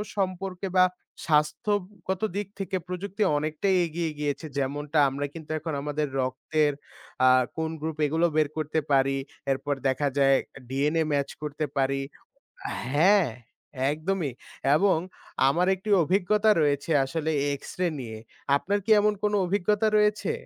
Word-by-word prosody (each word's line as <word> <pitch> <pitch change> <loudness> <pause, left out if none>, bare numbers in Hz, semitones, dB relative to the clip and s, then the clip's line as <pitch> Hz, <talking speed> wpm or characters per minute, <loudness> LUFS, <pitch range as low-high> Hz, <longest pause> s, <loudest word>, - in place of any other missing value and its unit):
সম্পর্কে 190 -1 -2
বা 185 - +8 0.4
স্বাস্থ্যগত 185 +4 0
দিক 205 -1 -2
থেকে 190 -1 -2
প্রযুক্তি 195 +3 -3
অনেকটাই 155 +6 0
এগিয়ে 165 0 -3
গিয়েছে। 145 +2 -2
যেমনটা 145 +3 -2
আমরা 140 +2 -3
কিন্তু 160 -2 -10
এখন 160 0 -4
আমাদের 150 +1 -2
রক্তের 145 +4 0 0.5
আ - - +7 0.3
কোন 160 0 -1
গ্রুপ 160 -1 -3
এগুলো 160 +4 +1
বের 155 -1 +3
করতে 155 +1 0
পারি। 135 0 +3 0.3
এরপর 140 +2 -1
দেখা 140 +2 +1
যায় 135 -1 +5 0.3
ডিএনএ 150 +5 +1
মাচ 140 -1 0
করতে 150 0 -3
পারি 135 0 +1 0.9
হ্যাঁ 180 +4 +5 0.6
একদমই 160 -2 -2 0.4
এবং 195 +4 +4 0.5
আমার 170 +6 +2
একটি 190 +3 -6
অভিজ্ঞতা 200 +5 +2
রয়েছে 145 +2 0
আসলে 160 +3 -2 0.2
এক্সরে 180 +5 -3
নিয়ে। 110 -4 -6 0.4
আপনার 200 +7 0
কি 225 - -4
এমন 210 +1 +3
কোন 210 0 +1
অভিজ্ঞতা 205 +3 +1
রয়েছে? 210 - +2
160 Hz, 130 wpm, -26 LUFS, 145-190 Hz, 0.9 s, বা